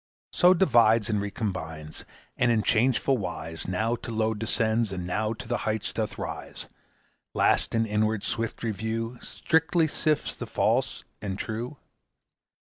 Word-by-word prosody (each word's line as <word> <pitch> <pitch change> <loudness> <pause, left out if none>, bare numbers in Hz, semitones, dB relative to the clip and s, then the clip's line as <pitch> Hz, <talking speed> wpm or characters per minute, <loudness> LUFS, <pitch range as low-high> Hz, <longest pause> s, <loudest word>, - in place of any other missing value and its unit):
So 180 +1 +5
divides 115 - +4
and 105 -1 +1
recombines, 90 -7 -5 0.3
And 120 -1 +3
in 110 -2 +2
changeful 125 +2 +2
wise 80 -3 -5
Now 110 +6 0
to 115 - -7
low 110 0 +1
descends, 110 0 0
and 90 -2 -4
now 105 +5 -1
To 115 +1 -9
the 120 0 0
height 110 -1 -2
doth - - -2
rise; - - -6 0.7
Last - - +2
in 115 0 +2
inward 110 -1 0
swift 115 0 -3
review 115 +2 -3
Strictly 160 0 +1
sifts 155 0 0
the - - -6
false - - +1 0.2
and 95 -2 -3
true? 115 +7 -4
110 Hz, 140 wpm, -27 LUFS, 105-120 Hz, 0.7 s, So